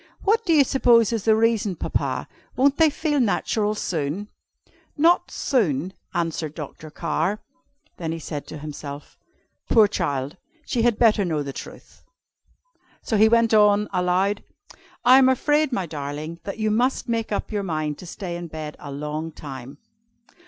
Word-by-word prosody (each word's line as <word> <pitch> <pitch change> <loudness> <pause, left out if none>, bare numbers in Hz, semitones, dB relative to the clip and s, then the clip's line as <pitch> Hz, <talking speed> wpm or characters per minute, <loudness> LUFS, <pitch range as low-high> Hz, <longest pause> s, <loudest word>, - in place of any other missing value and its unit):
What 445 +3 +2
do - - +3
you 295 -3 +6
suppose 240 -4 +4
is 225 -4 -2
the 220 -1 +5
reason, 220 -3 +1
Papa? - - -2 0.3
Won't 275 +2 +3
they 320 -1 +5
feel 295 0 -1
natural 215 -2 +1
soon?" 170 +2 -3 0.7
"Not 335 +4 +4
soon," 185 - 0 0.2
answered 165 -3 -2
Dr. 155 0 -8
Carr. 165 +6 -1 0.6
Then 165 -2 -3
he 165 - -3
said 150 -2 -6
to - - -7
himself: 145 -1 -8 0.5
"Poor 220 -3 +6
child! 145 -5 -2 0.3
she 240 - -1
had 235 -2 +2
better 220 -3 +4
know 160 -5 -1
the 140 -1 -6
truth." - - -11 1.0
So 225 - -1
he 215 +1 +6
went 230 0 +3
on, 210 -1 +5
aloud, 185 +3 +1 0.6
"I 255 +2 +8
am 260 -1 +5
afraid, 295 +3 +2
my 195 -7 -1
darling, 150 +2 -6
that 200 - -5
you 215 -1 0
must 250 +6 +1
make 230 -2 -2
up 205 - -2
your 210 -1 -1
mind 155 -5 -3
to 180 - -10
stay 175 0 -6
in 175 0 -6
bed 155 -1 -7
a 145 - -8
long 150 +3 -4
time." 135 -2 -9
195 Hz, 160 wpm, -23 LUFS, 155-230 Hz, 1.0 s, I